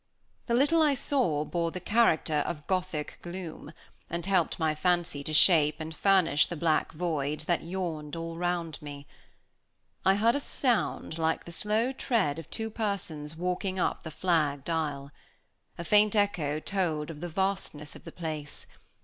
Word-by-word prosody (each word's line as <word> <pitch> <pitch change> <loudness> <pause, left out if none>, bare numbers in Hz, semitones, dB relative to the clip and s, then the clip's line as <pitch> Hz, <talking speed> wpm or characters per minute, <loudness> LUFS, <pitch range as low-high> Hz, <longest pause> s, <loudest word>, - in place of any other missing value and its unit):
The 235 - +2
little 290 +6 +4
I 295 -3 +4
saw 235 - +1
bore 170 0 -1
the 185 - -5
character 180 -6 +2
of 150 -4 -5
Gothic 185 -5 -2
gloom, 175 -2 -7 0.4
and 170 0 -3
helped 190 -4 +1
my 160 -1 +1
fancy 170 -3 0
to 155 - -5
shape 155 -1 +5
and 160 0 -6
furnish 185 -5 +4
the 175 - -5
black 160 0 +1
void 155 -3 -2
that 170 +2 0
yawned 165 -4 -4
all 165 0 -5
round 175 -2 -2
me. 145 -1 -8 1.0
I 190 - +5
heard 225 +3 +4
a - - +1
sound 240 - 0
like 160 0 0
the 170 - -8
slow 215 +7 +1
tread 225 - 0
of 165 - -10
two 220 -1 -4
persons 175 -9 -3
walking 180 +2 -2
up 180 - 0
the 160 - -7
flagged 155 -3 0
aisle. 145 -4 -2 0.7
A 170 - -4
faint 210 +2 +4
echo 165 -8 +1
told 165 -4 -1
of 150 -1 -10
the 175 - -4
vastness 190 -5 -2
of - - -12
the - - -9
place. 155 -4 -6
170 Hz, 165 wpm, -29 LUFS, 155-195 Hz, 1.0 s, shape